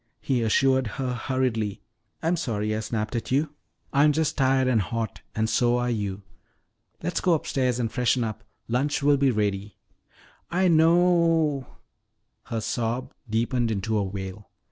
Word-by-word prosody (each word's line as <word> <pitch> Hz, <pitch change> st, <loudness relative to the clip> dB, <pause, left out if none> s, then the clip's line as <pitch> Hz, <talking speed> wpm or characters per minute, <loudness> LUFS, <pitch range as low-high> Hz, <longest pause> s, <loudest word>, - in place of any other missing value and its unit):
he 130 Hz, -3 st, 0 dB
assured 130 Hz, +3 st, +3 dB
her 130 Hz, -2 st, -1 dB
hurriedly. 120 Hz, -4 st, -1 dB, 0.4 s
"I'm 165 Hz, +2 st, +2 dB
sorry 110 Hz, -9 st, -1 dB
I -, -, -1 dB
snapped 110 Hz, +1 st, -3 dB
at 115 Hz, -, -3 dB
you. 145 Hz, +3 st, +1 dB, 0.4 s
I'm 145 Hz, +2 st, +5 dB
just 160 Hz, 0 st, 0 dB
tired 130 Hz, -1 st, +3 dB
and 120 Hz, -4 st, +3 dB
hot, 110 Hz, +4 st, -4 dB
and 110 Hz, 0 st, +1 dB
so 120 Hz, +1 st, +2 dB
are 125 Hz, 0 st, 0 dB
you. 100 Hz, -3 st, -3 dB, 0.8 s
Let's 175 Hz, +2 st, -1 dB
go 180 Hz, -, +3 dB
upstairs 130 Hz, -5 st, 0 dB
and 115 Hz, -2 st, -1 dB
freshen 125 Hz, 0 st, +1 dB
up. 110 Hz, -2 st, -4 dB, 0.2 s
Lunch 140 Hz, +5 st, 0 dB
will 145 Hz, 0 st, +5 dB
be 135 Hz, 0 st, +3 dB
ready 105 Hz, -3 st, -1 dB, 0.4 s
" -, -, -29 dB
"I 185 Hz, -1 st, +4 dB
kno 160 Hz, 0 st, +5 dB
o 170 Hz, -, +5 dB, 0.6 s
ow 130 Hz, -, -13 dB, 0.4 s
" -, -, -51 dB
her 115 Hz, -1 st, -3 dB
sob 120 Hz, +3 st, -2 dB, 0.2 s
deepened 115 Hz, +2 st, 0 dB
into 110 Hz, +1 st, -1 dB
a 105 Hz, -, +2 dB
wail. 95 Hz, +1 st, -6 dB
120 Hz, 165 wpm, -25 LUFS, 110-135 Hz, 0.8 s, I'm